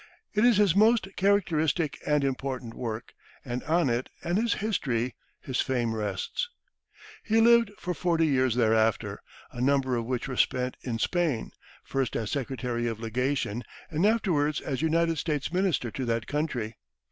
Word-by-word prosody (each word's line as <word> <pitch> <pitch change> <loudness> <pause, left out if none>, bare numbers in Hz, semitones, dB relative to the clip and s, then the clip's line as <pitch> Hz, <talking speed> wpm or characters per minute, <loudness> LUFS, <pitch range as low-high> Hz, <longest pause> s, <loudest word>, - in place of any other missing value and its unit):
It 210 0 +2
is 240 -4 +6
his 200 -5 +4
most 220 0 +4
characteristic 170 -6 +1
and 150 -1 +3
important 130 -3 -3
work, 115 0 -5 0.3
and 125 -1 -3
on 165 +1 +2
it 120 +1 -1
and 175 - 0
his 230 +1 +1
"History," 130 - -1 0.3
his 130 -2 -1
fame 120 -4 0
rests. 105 - -2 0.7
He 225 0 +2
lived 235 -1 +6
for 180 - -3
forty 165 0 +1
years 130 -5 +2
thereafter, 110 -2 +2 0.3
a 120 - -6
number 135 -1 +2
of 115 -1 -2
which 125 -1 -2
were 130 -2 -5
spent 125 0 +1
in 120 -3 -3
Spain, 160 -2 0 0.3
first 135 -2 -2
as 110 -2 -2
secretary 125 -3 -2
of 115 -2 -3
legation, 120 0 -1 0.3
and 160 +2 0
afterwards 175 -9 +2
as 135 0 -3
United 165 0 +2
States 150 0 -2
minister 180 - +1
to 130 - -4
that 115 -1 -1
country. 125 -8 -2
135 Hz, 160 wpm, -28 LUFS, 120-175 Hz, 0.7 s, is